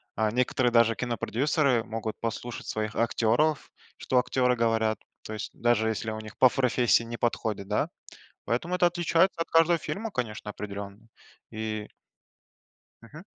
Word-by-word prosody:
А 110 0 +1
некоторые 125 +1 +1
даже 115 -1 +4
кинопродюсеры 125 +2 +1
могут 110 -1 -5
послушать 115 +1 -5
своих 110 0 -2
актеров, 120 +6 +1 0.3
что 130 - +1
актеры 125 0 +2
говорят. 115 -1 +1 0.2
То 110 - -7
есть 105 - -5
даже 115 -2 +2
если 110 0 -2
у 110 - -5
них 110 0 -10
по 130 - +7
профессии 125 -2 +2
не 115 0 -6
подходит, 110 -4 -1
да. - - 0 0.6
Поэтому 145 +10 -1
это 180 -1 +4
отличается 175 +1 +2
от 165 - -1
каждого 165 +1 +4
фильма, 220 +7 -4
конечно, 110 - -4
определенно, 100 +1 -7 0.4
и 110 -1 -4 1.1
Мгм. 150 +9 -12
115 Hz, 145 wpm, -27 LUFS, 110-130 Hz, 1.1 s, по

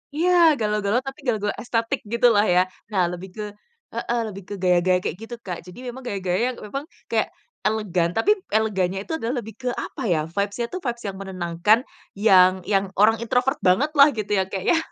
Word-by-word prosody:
Iya 345 +3 +2 0.3
galau-galau, 210 +1 +1
tapi 270 - -6
galau-galau 210 -4 0
estetik 230 -1 -1
gitulah 230 -3 +4
ya. - - +6 0.3
Nah 185 -3 +2
lebih 180 +2 -7
ke 210 - -3 0.5
heeh, 240 0 -1
lebih 195 -2 -8
ke - - -4
gaya-gaya 180 0 +4
kayak 175 - -3
gitu 240 +2 -7
Kak. 180 -2 -4
Jadi 180 +7 -12
memang, 255 +2 -7
gaya-gaya 190 +2 0
memang, 275 +8 -6 0.2
kayak - - +1 0.4
elegan 185 -6 0
tapi 360 - +3 0.2
elegannya 195 -3 0
itu - - -10
adalah 240 +1 -2
lebih 220 - -9
ke 250 - -4
apa 270 - -6
ya, 155 - +1
vibes-nya 200 +5 -1
itu 370 - -4
vibes 235 -1 -3
yang 190 -1 -5
menenangkan, 185 +2 +2 0.4
yang 190 -3 +6 0.2
yang 195 0 +3
orang 220 +2 +4
introvert 250 +4 0
banget 235 +12 +3
lah 280 - +10
gitu 210 -1 -4
ya - - +3
Kak 190 -1 -4
ya, 335 - +5
210 Hz, 185 wpm, -23 LUFS, 185-235 Hz, 0.5 s, lah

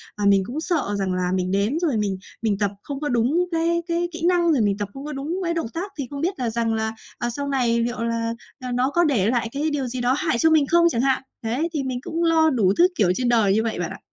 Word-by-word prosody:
à, 205 - -2
mình 195 -1 +5
cũng 265 +9 -4
sợ 315 - -1
rằng 190 -1 -1
là 180 0 -1
mình 185 0 -1
đến 200 +9 +1
rồi 295 -9 +1
mình 200 -3 -1 0.2
mình 215 -3 +1
tập 200 -1 0
không 280 -1 -5
có 295 - -2
đúng 250 +9 +2
cái 335 +1 +1
cái 345 +1 0
kỹ 330 0 -7
năng, 350 -2 +3
rồi 280 -6 +3
mình 200 -2 +1
tập 205 -1 -3
không 270 +1 -8
có 300 - -5
đúng 290 +5 -3
với 340 -2 -1
động 330 -7 -2
tác, 385 +4 -4
thì 275 -4 -3
không 280 0 -6
biết 360 -1 -1
là 245 -3 0
rằng 230 0 0
là, 220 0 -1 0.2
à, 240 - -2
sau 280 +4 -4
này 245 -4 +1
liệu 240 0 -2
là, 230 0 -1 0.3
à, 250 -1 -5
nó 250 +2 +1
có 345 +4 +2
để 240 - +2
lại 235 -2 0
cái 290 +4 -1
điều 280 -4 -2
gì 250 +1 -4
đó 245 +1 +2
hại 315 -9 0
cho 320 - +4
mình 310 -3 +4
không 340 +2 +4
chẳng 235 -7 0
hạn. 270 0 +1 0.2
Đấy, 255 +9 -1
thì 295 -3 -1
mình 255 -2 -3
cũng 330 +5 -3
lo 320 -1 +4
đủ 210 -9 +2
thứ, 355 - +7
kiểu, 195 -5 +3
trên 250 -1 0
đời 220 -5 +4
như 220 +2 +2
vậy 225 -5 -2
bạn 175 - -2
ạ. - - -8
255 Hz, 290 wpm, -23 LUFS, 225-315 Hz, 0.3 s, thứ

